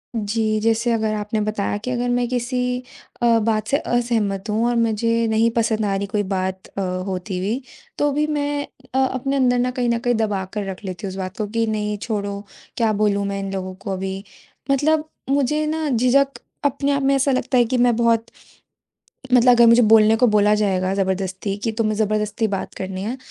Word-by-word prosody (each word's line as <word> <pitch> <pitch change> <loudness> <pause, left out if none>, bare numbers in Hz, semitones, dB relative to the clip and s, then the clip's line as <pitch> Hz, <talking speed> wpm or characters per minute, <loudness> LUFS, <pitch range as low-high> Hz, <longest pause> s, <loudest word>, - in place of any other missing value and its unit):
जी, 215 0 0
जैसे 230 +2 +1
अगर 220 -1 0
आपने 210 +1 -2
बताया 210 -1 -1
कि 225 +5 -5
अगर 245 0 -1
मैं 245 0 +1
किसी 250 +1 -1 0.6
अ, 235 -1 +4
बात 215 -1 0
से 280 - +2
असहमत 225 -7 -1
हूँ 220 +2 +1
और 240 - +1
मुझे 230 0 +1
नहीं 225 +1 +3
पसंद 220 -2 0
आ 200 -1 0
रही 200 +1 -2
कोई 205 +1 -1
बात 190 -1 -3
अ, 200 - -6 0.3
होती 185 0 -4
हुई 215 +8 -2 0.4
तो 290 0 +2
भी 300 +2 +1
मैं 290 -1 -1 0.3
अ, - - +3
अपने 265 +1 0
अंदर 250 -2 +3
न 250 +1 +1
कहीं 245 -1 -1
न 235 0 +1
कहीं 245 0 +1
दबाकर 205 -2 -2
रख 190 +2 -7
लेती 190 +2 -5
हूँ - - -3
उस 190 - -8
बात 185 +1 -5
को 215 - -2
कि 230 +2 0
नहीं, 210 -1 -2
छोड़ो 200 -2 -3 0.4
क्या 225 -2 +2
बोलूँ 200 -1 +1
मैं 200 0 -3
इन 195 0 -4
लोगों 185 -1 -4
को 195 +1 -6
अभी? 190 +1 -4 0.5
मतलब 305 +3 +2 0.2
मुझे 285 +2 +1
न 315 0 -1
झिझक 275 +3 +2 0.3
अपने 280 0 +1
आप 280 0 +1
में 275 +1 +3
ऐसा 275 +1 +2
लगता 255 0 0
है 240 - +5
कि 250 +2 -1
मैं 240 -1 +3
बहुत 230 -1 +2 1.1
मतलब 250 0 +6
अगर 240 -1 +6
मुझे 230 +1 +6
बोलने 220 0 +6
को 250 +2 +4
बोला 210 -1 +4
जाएगा 190 -3 0
ज़बरदस्ती 190 0 -2
कि 225 - 0
तुम्हें 215 -1 +1
ज़बरदस्ती 215 +1 0
बात 195 -1 -4
करनी 190 0 -5
है, 230 +6 -3
220 Hz, 205 wpm, -21 LUFS, 200-245 Hz, 1.1 s, मतलब